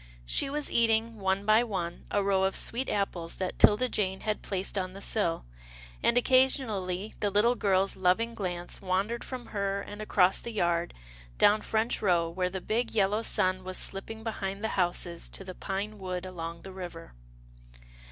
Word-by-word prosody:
She - - +3
was 295 +1 -1
eating, 225 -1 +2
one 190 +1 0
by 215 +2 +5
one, 180 -7 -4
a 205 - +1
row 195 -1 +2
of 190 - 0
sweet 255 +3 +1
apples 180 -5 -2
that 185 -1 -4
'Tilda 215 +5 +6
Jane 190 -5 -1
had 215 -1 -2
placed 195 0 -3
on 185 -2 -2
the 195 - -9
sill, 195 - -1 0.6
and 235 - +3
occasionally 220 -7 +2
the 205 - +1
little 210 +5 +3
girl's 195 -4 +1
loving 190 +5 +1
glance 175 -4 -3
wandered 195 +5 -1
from 255 -2 -7
her, 200 -1 -1
and 205 +1 -8
across 190 -3 +3
the - - -5
yard, 175 -5 0 0.4
down 210 +1 +5
French 220 +2 0
Row 175 -5 +2
where 180 +1 -1
the 190 0 -5
big, 225 +4 -1
yellow 205 +1 +2
sun 185 -4 +1
was 185 0 -3
slipping 220 +3 -2
behind 200 -2 -4
the 220 - 0
houses 175 -2 -1
to - - -7
the 185 -1 -7
pine 200 +3 -4
wood 185 -1 -4
along 170 -2 -6
the 190 - -9
river. 175 - -8
195 Hz, 175 wpm, -29 LUFS, 185-220 Hz, 0.6 s, Tilda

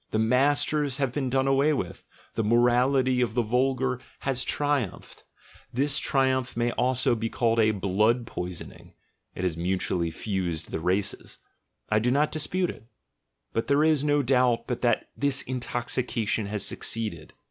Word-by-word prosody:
The - - -1
'masters' 140 +4 +2
have 135 -4 -1
been 135 -3 -1
done 130 +1 +1
away 135 +3 +3
with; 95 -11 -4 0.3
the 115 - -1
morality 125 +3 +3
of 120 -2 -1
the 120 - +2
vulgar 130 +2 +1
man 125 - -22
has 135 -2 -1
triumphed. 145 - -2 0.5
This 140 +4 +1
triumph 130 -3 0
may 120 0 +1
also 125 0 +1
be 115 0 -2
called 115 -1 +1
a 110 -1 +5
blood 110 +4 +1
poisoning 90 -5 -7 0.4
(it 90 - -5
has 90 -3 0
mutually 90 0 -1
fused 85 -2 -3
the - - -2
races) 95 +4 -2 0.3
— - - -44
I 105 - +4
do 120 +3 +1
not 145 +4 +2
dispute 175 +4 -1
it; 110 - -15 0.7
but 115 - -1
there 140 +2 +3
is 155 -3 +3
no 145 -1 +2
doubt 125 -2 +2
but 125 - -3
that 120 -1 +2
this 140 -1 +1
intoxication 120 -3 -2
has 105 -1 -1
succeeded. 105 -9 -3
125 Hz, 160 wpm, -26 LUFS, 110-135 Hz, 0.7 s, a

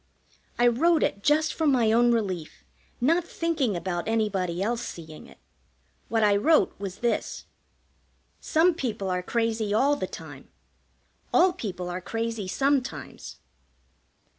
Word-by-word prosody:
I 240 - +3
wrote 310 +8 +3
it 200 - -1
just 305 +5 +2
for 320 - 0
my 245 -6 +3
own 240 +1 +4
relief, 190 -9 -2 0.4
not 330 +8 +2
thinking 325 - -1
about 175 0 -3
anybody 195 -6 0
else 230 +4 -1
seeing 160 -8 -9
it. - - -17 0.7
What 225 -1 +1
I 205 -1 +4
wrote 310 +9 +3
was 195 -2 -6
this: 235 - -1 0.9
"Some 335 +3 +3
people 225 - -3
are 180 0 -1
crazy 220 0 -1
all 280 +6 +3
the - - -3
time; - - -10 0.8
All 360 +1 +4
people 185 - -5
are 180 +1 -4
crazy 225 0 -3
sometimes." 275 +5 -2
230 Hz, 135 wpm, -26 LUFS, 195-285 Hz, 0.9 s, own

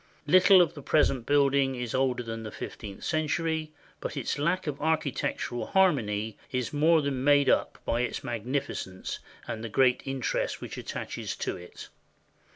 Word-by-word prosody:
Little 185 +3 +7
of 165 - -3
the 145 - -9
present 135 -4 +2
building 140 -2 +3
is 125 -2 -4
older 130 -2 +1
than 115 -1 -5
the 110 - -6
fifteenth 100 -2 -8
century; 160 0 -1 0.3
but - - -5
its - - -2
lack 175 +5 +1
of 145 -2 -4
architectural 145 -5 -1
har 190 -2 +5
mony 105 -4 -3
is 125 +1 -2
more 155 +1 +4
than 135 -2 -1
made 145 0 +5
up - - +1
by 120 - +1
its 125 - -3
magnificence 120 -5 -3 0.3
and 110 - -4
the 115 - -4
great 125 +2 +3
interest 135 -3 -1
which - - -7
attaches - - -5
to - - -3
it. 90 -1 -11
135 Hz, 165 wpm, -28 LUFS, 120-155 Hz, 0.3 s, Little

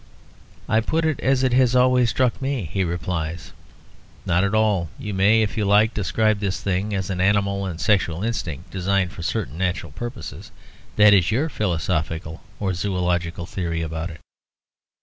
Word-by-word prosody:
I 110 - +3
put 160 +8 0
it 155 -3 0
as 135 0 +2
it 130 -2 +2
has 125 -1 +4
always 125 -1 +4
struck 125 +2 0
me; 135 - -2
he 95 - +1
replies, 85 -1 -4 0.7
"Not 90 +1 +2
at 100 +2 0
all. 105 -6 +2
You 105 - -5
may, 105 +4 +4
if 105 - -3
you 110 - +1
like, 105 +3 +4
describe 110 +1 +1
this 100 -2 -2
thing 100 +2 -1
as 95 0 -2
an 90 -1 -2
animal 100 0 +1
and 85 -3 -6
sexual 95 -5 +1
instinct, 90 -7 -4
designed 95 -1 0
for 85 - -9
certain 85 -2 -3
natural 95 0 -2
purposes; 120 +1 -7 0.5
that 105 0 +7
is 95 -4 +4
your 135 +9 +1
philosophical 80 - -2 0.2
or 95 -2 -1
zoölogical 90 -2 -1
theory 85 -3 -3
about 80 +1 -4
it. 80 0 -11
100 Hz, 170 wpm, -23 LUFS, 85-110 Hz, 0.7 s, that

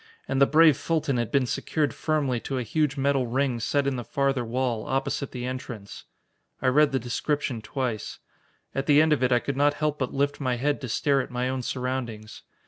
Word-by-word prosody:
And 135 +1 0
the 140 - +7
brave 155 -1 +6
Fulton 155 -5 0
had 120 -2 -1
been 135 -2 +3
secured 145 +2 -1
firmly 145 -6 0
to 135 +3 -4
a 125 - -1
huge 145 +4 0
metal 135 -2 +1
ring 130 0 0
set 140 +5 0
in 140 -2 0
the 120 - -4
farther 135 +2 0
wall, 120 -1 -2
opposite 135 +1 -1
the 125 -1 -5
entrance. 125 -5 -7 0.5
I 130 - +2
read 150 +2 +4
the 135 - +1
description 125 0 -2
twice. 120 -2 -3 0.6
At 135 - -2
the 145 -1 +6
end 155 0 +5
of 145 - 0
it 130 0 +2
I 125 - +5
could 135 +2 -3
not 145 +1 +3
help 150 -1 -1
but 130 -2 -1
lift 140 +1 0
my 130 -2 0
head 145 +4 -1
to 130 - -5
stare 140 +3 +2
at - - -7
my 125 +1 -1
own 130 0 -2
surroundings. 125 -4 -4
130 Hz, 215 wpm, -26 LUFS, 125-145 Hz, 0.6 s, the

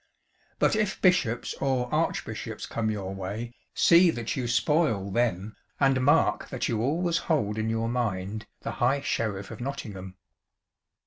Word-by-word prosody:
But - - +3
if 215 -2 0
bishops 170 - +2
or 130 -2 +1
archbishops - - -2
come 110 -2 -2
your 100 -3 -3
way, 100 +5 -5 0.2
see 175 +1 +6
that 120 -7 -2
you 125 -3 -2
spoil 120 - +1
them, 105 -2 0 0.2
and 135 -2 +3
mark 145 +5 +3
that 130 - -2
you 110 -3 -1
always 165 +6 +1
hold 110 -9 +1
in 110 0 -1
your 115 0 0
mind 110 -4 -2
the - - -4
High 140 +1 +3
Sheriff 105 -7 -2
of - - -8
Nottingham." 105 -9 -6
120 Hz, 145 wpm, -27 LUFS, 105-140 Hz, 0.2 s, see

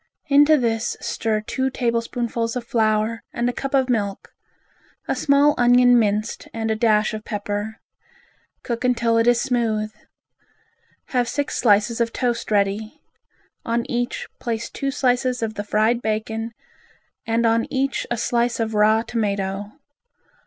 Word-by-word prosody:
Into 290 +2 +6
this 230 -3 -1
stir 215 -1 -1
two 260 +5 -2
tablespoonfuls 235 -1 -2
of 245 -2 -4
flour 220 -2 +1
and 235 +1 -1
a 245 - 0
cup 275 +2 -3
of 265 -1 +3
milk; 205 -5 -2 0.8
a - - 0
small 285 +1 +4
onion 245 0 +6
minced 210 0 -1
and 225 -1 -1
a - - +1
dash 215 -1 +2
of 215 0 -5
pepper. 205 0 -4 0.8
Cook 235 0 -3
until 235 -2 +2
it 230 - +2
is 240 -1 +4
smooth. 225 -4 0 1.2
Have 245 -2 +1
six 285 +4 -2
slices 215 +1 +3
of 230 0 +1
toast 240 -2 -1
ready. 210 +5 0 0.6
On 235 0 -1
each, 245 0 -2
place 230 -2 -3
two 275 - -3
slices 250 -2 0
of 220 -1 -2
the 205 - -4
fried 220 +3 +1
bacon 220 +1 -3 0.7
and 230 +1 +1
on 230 0 +2
each 270 0 -1
a 240 - -1
slice 235 +1 0
of 225 -1 -1
raw 215 +1 +4
tomato. 200 -3 -2
230 Hz, 145 wpm, -22 LUFS, 215-245 Hz, 1.2 s, Into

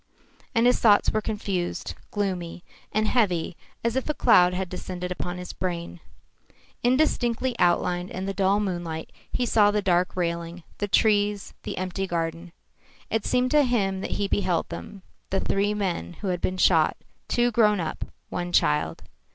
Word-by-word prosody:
And 230 +1 +4
his 245 - +4
thoughts 205 -3 +5
were 215 - 0
confused, 200 -5 -3 0.2
gloomy, 180 -4 -3 0.3
and 215 +1 +1
heavy 185 -9 +1 0.3
as 235 +1 0
if 265 +3 -1
a 300 - 0
cloud 180 -9 +5
had 185 +1 -2
descended 180 0 -5
upon 180 0 -4
his 180 0 -7
brain. 175 -1 -4 0.8
Indistinctly 250 -1 +1
outlined 175 0 +2
in 185 +1 -5
the 195 - -2
dull 195 +1 +2
moonlight 175 -5 -3 0.2
he 250 - 0
saw 210 -3 +4
the 210 0 +1
dark 180 -1 +2
railing, 170 -1 -3 0.2
the 205 - -1
trees, 205 -1 +2
the - - -5
empty 185 +1 -2
garden. 165 0 -3 0.6
It 225 -2 0
seemed 250 0 +2
to 300 - +6
him 195 -7 0
that - - -3
he 200 - 0
beheld 185 -4 0
them 135 - -8 0.3
the 195 - 0
three 205 +2 0
men 185 -4 -2
who 200 - -2
had 180 -1 -1
been 185 - -1
shot, 165 -4 +4 0.3
two 240 0 +2
grown 210 -3 +4
up, 165 -2 -3 0.3
one 175 0 -3
a - - -7
child. 80 - +2
190 Hz, 170 wpm, -25 LUFS, 175-210 Hz, 0.8 s, to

